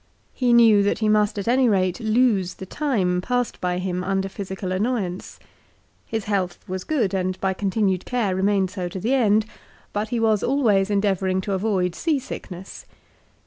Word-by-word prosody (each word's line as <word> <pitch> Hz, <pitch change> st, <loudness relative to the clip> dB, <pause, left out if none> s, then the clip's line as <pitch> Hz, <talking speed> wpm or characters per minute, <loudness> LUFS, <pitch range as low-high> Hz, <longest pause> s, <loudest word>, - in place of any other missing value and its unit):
He 250 Hz, -2 st, +1 dB
knew 230 Hz, -3 st, +6 dB
that 200 Hz, -, +1 dB
he 220 Hz, -, 0 dB
must 210 Hz, -1 st, +2 dB
at 200 Hz, -, -4 dB
any 250 Hz, +1 st, +4 dB
rate 185 Hz, -2 st, +1 dB
lose 220 Hz, -5 st, +1 dB
the 190 Hz, -, -8 dB
time 190 Hz, -8 st, 0 dB
passed 245 Hz, +3 st, -2 dB
by 180 Hz, 0 st, -1 dB
him 180 Hz, 0 st, -2 dB
under 195 Hz, 0 st, -1 dB
physical 190 Hz, -1 st, -5 dB
annoyance. 195 Hz, -2 st, -2 dB, 0.7 s
His 225 Hz, -2 st, -3 dB
health 190 Hz, -4 st, -2 dB
was 185 Hz, 0 st, -4 dB
good, 235 Hz, -11 st, 0 dB
and 185 Hz, -1 st, -1 dB
by 190 Hz, -1 st, 0 dB
continued 190 Hz, -1 st, 0 dB
care 225 Hz, -7 st, -1 dB
remained 190 Hz, -1 st, +1 dB
so 185 Hz, -3 st, -4 dB
to 190 Hz, -, -6 dB
the 230 Hz, +8 st, 0 dB
end; 215 Hz, -4 st, +3 dB, 0.5 s
but 210 Hz, +1 st, -2 dB
he 240 Hz, -, -1 dB
was 220 Hz, -3 st, +2 dB
always 220 Hz, -8 st, +2 dB
endeavouring 195 Hz, -2 st, +1 dB
to 200 Hz, +1 st, -3 dB
avoid 190 Hz, -3 st, 0 dB
sea 320 Hz, -, 0 dB
sickness. 190 Hz, -7 st, -8 dB
200 Hz, 175 wpm, -23 LUFS, 185-225 Hz, 0.7 s, knew